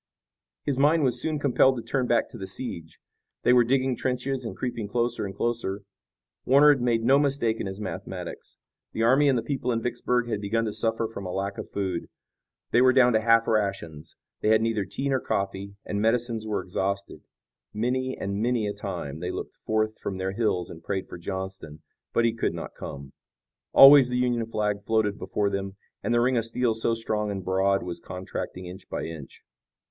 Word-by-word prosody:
His 135 -2 -1
mind 150 +3 +4
was 125 -3 +2
soon 155 -1 -1
compelled 135 -2 +3
to 115 - -5
turn 125 +2 -1
back 120 - +2
to - - -10
the 95 - -5
siege. 85 -6 -5 0.5
They 125 - +5
were 125 -1 +6
digging 130 +1 +1
trenches 130 +2 -2
and 115 - -6
creeping 120 -4 -3
closer 120 -1 -1
and 95 - -8
closer. 105 -4 -2 0.6
Warner 140 +3 +6
had 135 - -4
made 115 -2 +1
no 135 +4 +5
mistake 135 -6 +1
in - - -3
his 95 +1 -6
mathematics. 105 -3 -7 0.4
The 115 - -1
army 135 +5 +5
and 130 - +3
the 115 - -1
people 130 -3 -2
in 115 - 0
Vicksburg 120 0 0
had 105 -3 -2
begun 115 +3 0
to 110 - -2
suffer 115 0 0
from 100 -4 -7
a - - -4
lack 100 +1 -3
of - - -6
food. 95 -4 -3 0.6
They 120 - +5
were 130 0 +6
down 125 -2 +5
to 110 - +3
half 115 0 +4
rations. 95 -8 -2 0.3
They - - 0
had 110 0 +5
neither 110 -3 0
tea 100 +9 -3
nor 135 -1 +2
coffee, 100 -2 -3
and 100 0 -2
medicines 115 0 0
were 105 - -1
exhausted. 100 +2 -3 0.5
Many 130 +4 -1
and 100 +1 -3
many 120 -2 +1
a 105 - -2
time 90 -8 -5
they 90 +1 -3
looked - - -5
forth 110 0 -1
from 95 - -4
their 95 0 -2
hills 95 -5 -1
and 80 - -10
prayed 95 -1 -3
for 90 - -8
Johnston, 95 -4 -6 0.3
but 115 - +2
he 115 - +2
could 115 - -1
not - - -6
come. 70 0 -8 0.6
Always 135 -2 +9
the 125 - -1
Union 120 -2 0
flag 105 -2 -1
floated 105 -1 0
before 100 -1 -1
them, 100 0 -3 0.3
and - - -2
the 120 0 +3
ring 125 +1 +2
of 115 - +1
steel 115 0 0
so 115 +1 0
strong 110 -2 -2
and 95 -3 -4
broad 95 +1 +2
was 85 -1 -5
contracting 90 0 -6
inch 90 +2 -10
by - - -3
inch. 80 -4 -9
110 Hz, 205 wpm, -26 LUFS, 100-125 Hz, 0.6 s, Always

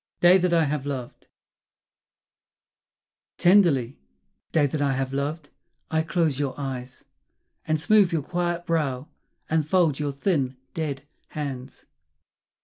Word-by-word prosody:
Day 180 +2 +7
That 180 -1 +1
I 165 -1 +4
Have 145 -1 -2
Loved 130 -4 -6 2.1
Tenderly, 170 - +4 0.5
day 155 -3 +3
that 145 +1 -2
I 140 -1 +2
have 135 0 -2
loved, 145 +2 -3 0.4
I 160 0 +2
close 160 -4 0
your 135 -3 -2
eyes, 130 -2 -6 0.6
And 155 0 +1
smooth 200 +3 +4
your 160 -4 -1
quiet 175 +1 -2
brow, 145 -5 -1 0.4
and 155 -1 0
fold 170 -7 +3
your 145 -1 -1
thin 140 -3 -1 0.2
dead 145 -4 -4 0.2
hands. 135 -3 -6
150 Hz, 125 wpm, -25 LUFS, 135-170 Hz, 2.1 s, Day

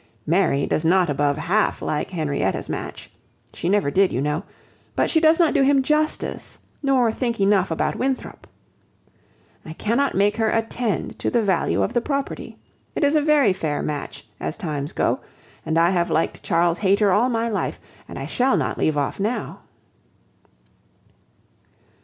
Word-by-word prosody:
Mary 165 -4 +2
does 155 - -1
not 175 -1 +3
above 145 0 +1
half 200 +7 +1
like 150 -1 -2
Henrietta's 145 - -2
match. - - -6 0.4
She 170 - -3
never 200 -7 +2
did, 195 +2 +3
you - - -1
know. 150 +4 -1 0.5
But - - +1
she 320 - +4
does 320 0 +5
not 335 -3 +3
do 290 - +3
him 270 0 +4
justice, 305 +2 -1 0.2
nor 260 -5 +2
think 235 -1 -2
enough 195 -1 +3
about 160 - -1
Winthrop. 265 0 -3 1.2
I 160 - -8
cannot 235 +10 0
make 205 +2 +2
her 225 -1 +2
attend 225 0 -2
to - - -1
the 235 -2 +1
value 190 -4 +1
of 225 - -2
the 240 - +2
property. 275 +1 -4 0.4
It - - -1
is 285 +2 +3
a 305 - +4
very 290 -9 +4
fair 155 -6 -2
match, 145 -6 -5
as - - -4
times 150 -7 -4
go; - - 0 0.5
and 160 - 0
I 170 +2 +4
have 175 -2 +1
liked 160 - 0
Charles 170 0 +1
Hayter 200 0 +3
all 230 +7 +3
my 230 -1 0
life, 215 -3 -2 0.3
and - - -8
I - - -4
shall 260 +2 +1
not - - -2
leave 155 -1 +1
off 140 +5 -2
now." 215 +5 -2
200 Hz, 165 wpm, -22 LUFS, 165-250 Hz, 1.2 s, does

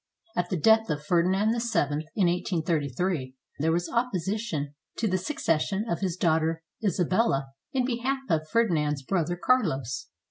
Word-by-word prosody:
At 175 0 0
the 185 - 0
death 220 +5 +4
of 150 -1 -2
Ferdinand 185 +6 +3
VII, 160 - 0
in 200 - +3
1833, 165 -4 -1 0.2
there 160 +3 +2
was 175 +1 0
opposi 215 -4 0
tion 150 -11 -3 0.2
to 225 - +1
the 185 -1 +1
succession 190 - 0
of 170 - -1
his 185 -3 -1
daughter 160 -1 +1 0.2
Isabella, 180 -6 +1 0.2
in 255 -2 +1
behalf 260 +2 -1
of 155 -1 0
Ferdinand's 155 -11 +1
brother 175 +2 0
Carlos. 165 - +1
175 Hz, 145 wpm, -27 LUFS, 155-215 Hz, 0.2 s, death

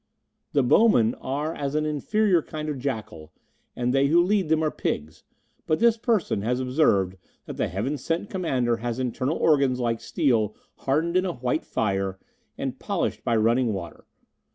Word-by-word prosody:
"The 140 - +3
bowmen 125 - +4
are 145 +4 -3
as 140 -1 -3
an 155 0 +1
inferior 180 +5 +1
kind 155 0 -6
of 145 -3 -4
jackal, 110 - -5 0.4
and 125 0 0
they 135 +1 +3
who 165 +4 +4
lead 190 -3 +1
them 160 0 +2
are 155 - +1
pigs, 75 +2 -4 0.4
but 155 - +2
this 230 0 +4
person 225 - 0
has 125 +4 0
observed 125 - +2 0.3
that - - -8
the - - 0
Heaven 125 - -3
sent 165 +9 -2
Commander 130 - 0
has 120 0 -3
internal 130 +3 -1
organs 140 -5 +3
like 115 -2 -1
steel 115 - +1 0.2
hardened 160 +6 0
in 185 - +2
a 175 - -2
white 125 +3 -2
fire 95 -2 -1 0.4
and - - -4
polished - - -2
by 115 - +1
running 115 +1 +2
water. 85 -5 -7
135 Hz, 170 wpm, -25 LUFS, 115-160 Hz, 0.4 s, bowmen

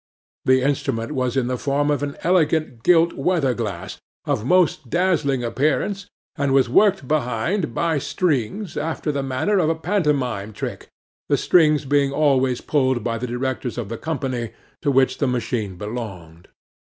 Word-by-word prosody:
The 130 0 +4
instrument 135 -3 -1
was 130 -3 -1
in 130 - +2
the 125 0 -2
form 145 +1 +1
of 145 - 0
an 145 -1 -4
elegant 160 -8 +1
gilt 170 +3 +4
weather 160 -8 +1
glass, 95 -6 -5 0.3
of - - -1
most 155 -3 +2
dazzling 150 -6 +1
appearance, 150 - -1 0.3
and 140 -1 0
was 135 -2 +4
worked 190 - +3
behind, 125 - -1
by 165 -3 +1
strings, 145 - -1
after 155 0 -2
the 140 -1 -2
manner 135 +10 0
of 160 - +2
a 165 - +1
pantomime 140 - -1
trick, - - -6 0.4
the - - +3
strings 150 -4 +3
being 140 0 +2
always 135 -4 +2
pulled 130 -5 +1
by 115 -1 -2
the 125 - -3
directors 125 0 -3
of 115 -5 -4
the 115 - -4
company 130 -7 -3 0.3
to 145 - 0
which 135 -1 +2
the 140 - +1
machine 120 -5 -2
belonged. 95 -7 -7
135 Hz, 160 wpm, -22 LUFS, 120-155 Hz, 0.4 s, The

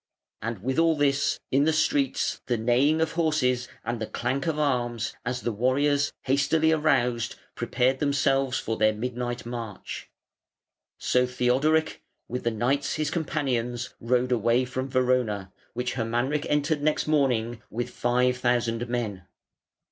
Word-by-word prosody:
And 110 -3 -4
with 130 +4 0
all 165 -1 +4
this, 145 -1 +1
in 140 +2 +4
the 160 - +4
streets 140 -3 +1
the 120 -2 +1
neighing 130 +8 +3
of 160 - +1
horses, 145 -7 +1 0.2
and 115 0 -3
the 110 - -2
clank 130 +4 -2
of 160 -2 0
arms, 120 -6 0
as 125 0 -2
the 120 - -1
warriors, 140 +5 +2
hastily 140 +4 +2
aroused, 125 -7 +1 0.2
prepared 125 +2 0
themselves 135 -2 +1
for 115 - -3
their 110 0 +3
midnight 120 +2 -4
march. 115 -4 -6 0.9
So 125 0 +2
Theodoric, 135 +6 +1 0.3
with 125 +1 -4
the - - +4
knights 125 +5 0
his 155 -1 -1
companions, 125 -7 -2
rode 125 +2 +1
away 120 +2 +2
from 130 +1 -4
Verona, 125 -7 0 0.2
which 125 +1 -2
Hermanric 120 +5 -1
entered 150 +1 +1
next 155 +1 +1
morning 125 -7 +1
with 120 +2 -4
five 125 +1 +1
thousand 120 -1 0
men. 105 -7 -3
125 Hz, 140 wpm, -26 LUFS, 120-140 Hz, 0.9 s, all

